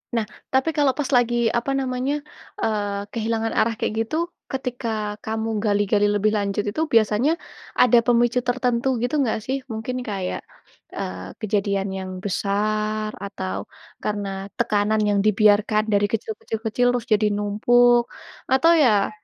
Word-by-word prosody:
Nah 225 - +1 0.3
tapi 265 +4 +3
kalau 280 -3 +3
pas 285 - -1
lagi, 240 0 +2 0.2
apa 275 +3 -3
namanya, 260 +1 -1 0.5
eee, 205 -2 -1
kehilangan 225 0 -1
arah 225 +1 +2
kayak - - -1
itu, 310 - -3 0.3
ketika 250 -3 -3 0.4
kamu 220 +1 -2 0.2
gali-gali 205 0 +2
lebih 210 +1 +2
lanjut 200 0 -1
itu, 260 +10 -3
biasanya, 225 +6 +4 0.5
ada 245 -1 +6
pemicu 240 0 +3
tertentu 245 0 0
gitu 245 +5 0
nggak 220 -4 0
sih? 265 +1 -1 0.2
Mungkin 225 +3 -4
kayak, 190 -3 -3 0.6
eee, 90 +1 -5
kejadian 200 -2 0
yang 190 -1 -5
besar, 215 +2 -1 0.2
atau, 95 - -4 0.5
karena 205 -1 -2 0.3
tekanan 215 -1 +2
yang 205 - +2
dibiarkan 215 0 +4
dari 205 0 +3
kecil, 220 0 -2
kecil, 225 - -4
kecil, 245 +3 +2
terus 240 -2 -2
jadi 210 0 +3
numpuk, 240 +4 +4 0.5
atau 330 +6 +5
ya, 215 -9 +4
220 Hz, 140 wpm, -23 LUFS, 205-245 Hz, 0.6 s, ada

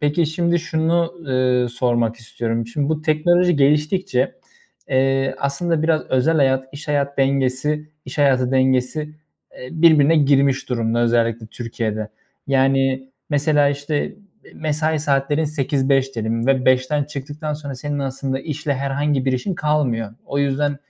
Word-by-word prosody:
Peki, 150 +2 +1
şimdi, 170 +2 0
şunu, 165 +1 0
ııı, 125 -1 +1
sormak 120 -2 0
istiyorum. 115 0 -3
Şimdi 140 +5 -2
bu 155 -1 -1
teknoloji 175 +2 +3
geliştikçe, 150 +6 +1 0.5
eee, 135 0 +1
aslında 155 +3 -1
biraz 160 -1 +2
özel 135 +5 +2
hayat, 135 -2 +2
iş 145 +2 -9
hayat 140 -1 -1
dengesi 135 +3 0 0.2
iş - - -8
hayatı 130 -3 +3
dengesi, 130 +2 +1 0.6
eee, 125 - -8
birbirine 160 -1 +5
girmiş 135 -2 +2
durumda 115 -1 0
özellikle 115 -1 +1
Türkiye'de. 110 -2 -4 0.4
Yani, 135 -1 +1 0.2
mesela, 145 0 +3
işte, 145 +7 -3 0.4
mesai 155 0 -1
saatlerin 145 +1 +1
8-5 135 -2 0
diyelim 115 +1 -2
ve 130 -2 +2
5'ten 130 +3 +2
çıktıktan 150 +1 -6
sonra 145 -2 -7
senin 145 +2 -4
aslında 135 0 -3
işle 145 -1 -3
herhangi 140 0 -1
bir 130 - +1
işin 130 +10 -2
kalmıyor. 130 -9 -1
O 140 - -2
yüzden 140 +1 0
140 Hz, 135 wpm, -20 LUFS, 130-150 Hz, 0.6 s, birbirine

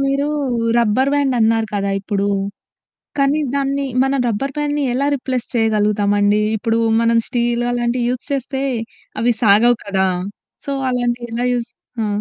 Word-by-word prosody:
మీరు 275 +1 +1 0.5
rubber 235 +4 +2
band 280 -2 +1
అన్నారు 225 0 +2
కదా 200 0 0
ఇప్పుడు. 200 0 -1 0.9
కానీ 275 +2 +2
దాన్ని 275 0 0 0.2
మనం 270 0 +1
రబ్బర్ 270 +5 -2
బ్యాండ్‌ని 295 0 -1
ఎలా 280 +2 0
రిప్లేస్ 255 -2 -3
చేయగలుగుతామండి? 210 -2 +2
ఇప్పుడు 225 +2 0 0.2
మనం 230 0 +3
స్టీలు 240 0 0
అలాంటివి 240 0 0
యూజ్ 250 0 -3
చేస్తే 270 0 -2 0.6
అవి 240 +1 +3
సాగవు 225 +3 +5
కదా! 190 -1 +1 0.6
సో, 280 - -2 0.2
అలాంటి 245 -1 -1
ఎలా 240 +2 -1
యూజ్ 235 -1 -3 0.3
ఆ! - - 0
240 Hz, 140 wpm, -19 LUFS, 220-270 Hz, 0.9 s, సాగవు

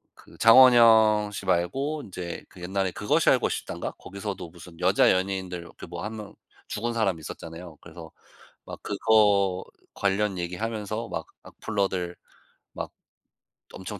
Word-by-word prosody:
그 - - -18
장원영 115 -3 +7
씨 100 - -6
말고 135 - -1
인제 90 -3 -7
그 90 - -15
옛날에 95 +1 -1
'그것이 105 +3 +1
알고 - - +3
싶다'인가? - - -5
거기서도 100 -3 -7
무슨 85 0 -14
여자 95 +2 +4
연예인들 95 -1 -1
이렇게 85 - -11
뭐 85 0 -7
1 110 +1 -5
명 105 -1 -9 0.3
죽은 115 +3 -3
사람 100 -7 0
있었잖아요. 80 +1 -9
그래서 85 -1 -12 0.5
막 - - -8
그거 100 -3 +2 0.3
관련 100 0 0
얘기하면서 105 +5 -4
막 - - -5 0.2
"악플러들 95 -4 -3 0.6
막 - - -6 0.8
엄청 100 +1 -7
95 Hz, 295 characters per minute, -26 LUFS, 90-110 Hz, 0.8 s, 장원영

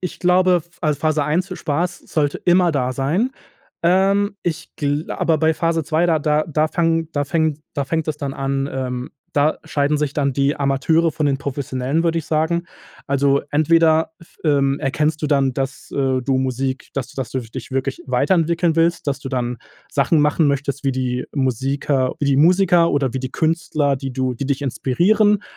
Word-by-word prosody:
ich 180 - -5
glaube, 180 +1 +4
f 170 0 -28
also, 150 -3 0
Phase 155 -2 +1
1, 180 +5 -1
Spaß 170 +4 -2
sollte 145 -2 0
immer 175 -1 +3
da 130 -3 0
sein. 160 - 0 0.5
Ähm, 195 +3 +2
ich 165 -1 -3
gla 145 +2 -2
aber 160 -2 +2
bei 160 +1 +3
Phase 165 0 0
2, 160 +3 +1
da 165 -2 +2
da 150 0 +1
da 155 -1 +1
fangen 165 -1 0
da 145 -1 0
fängt 160 0 0 0.2
da 140 - -1
fängt 160 +2 -2
es 150 -1 -2
dann 140 -2 -4
an, 135 0 -2
ähm, 125 -1 -4 0.2
da 145 +2 +2
scheiden 150 -1 0
sich 145 -1 -1
dann 140 -2 0
die 140 +2 +1
Amateure 145 +4 +1
von 150 - -2
den 140 -1 +1
Professionellen, 140 +1 -2
würde 165 -1 +1
ich 160 - -6
sagen. 160 +2 0 0.4
Also, 140 0 +2
entweder 160 +1 +3
f 170 - -19
ähm, 140 -2 +2
erkennst 150 +3 0
du - - +1
dann, 140 -3 +2
dass, 135 0 -4
äh, 135 -2 +1
du 130 +1 0
Musik 130 0 -2
dass 135 -3 -3
du - - -16
das 135 -3 -4
du 130 - -2
dich 120 +2 -9
wirklich 135 - -2
weiterentwickeln 170 -2 +1
willst, 170 0 +1
dass 140 -1 -1
du 135 - -6
dann 125 -2 -2 0.3
Sachen 160 - +2
machen 150 +2 +3
möchtest 140 0 -1
wie 135 - +2
die 125 -1 -2
Musiker 135 0 0
wie 145 - -1
die 140 -1 +3
Musiker 175 +2 +4
oder 135 -3 0
wie 130 - -2
die 130 0 -5
Künstler, 155 -3 0
die 135 0 -5
du 130 -1 -1
die 135 +3 -4
dich 140 -1 -1
inspirieren 200 - +2
145 Hz, 190 wpm, -20 LUFS, 135-165 Hz, 0.5 s, glaube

